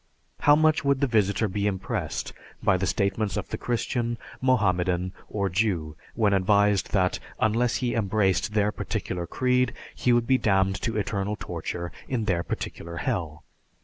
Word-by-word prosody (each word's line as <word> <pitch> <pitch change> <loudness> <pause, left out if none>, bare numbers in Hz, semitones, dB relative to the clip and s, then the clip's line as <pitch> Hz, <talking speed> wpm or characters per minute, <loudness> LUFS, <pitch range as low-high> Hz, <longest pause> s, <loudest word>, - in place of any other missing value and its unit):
How 145 - +6
much 155 0 +3
would 140 -1 +2
the 140 - +3
visitor 110 -3 +2
be 100 +1 -1
impressed 95 -3 -3 0.3
by 95 - +4
the 95 +1 -1
statements 100 0 0
of 105 - -4
the - - -3
Christian, 120 0 -1 0.2
Mohammedan, 95 -7 +1 0.2
or 100 -2 -1
Jew, 90 -5 0 0.2
when 105 -3 +3
advised 100 +1 +3
that 90 -2 +2 0.2
unless 115 +3 +2
he 125 -2 0
embraced 105 -2 +1
their 105 0 +3
particular 90 -4 -4
creed, 125 +2 +1 0.2
he 125 - +1
would 120 -1 +3
be 130 +1 +3
damned 95 -2 +2
to 115 -2 -1
eternal 105 0 -1
torture 85 0 -5 0.2
in 120 -4 -1
their 90 -5 +1
particular 85 0 -5
Hell? 75 -4 -3
105 Hz, 155 wpm, -26 LUFS, 95-115 Hz, 0.3 s, How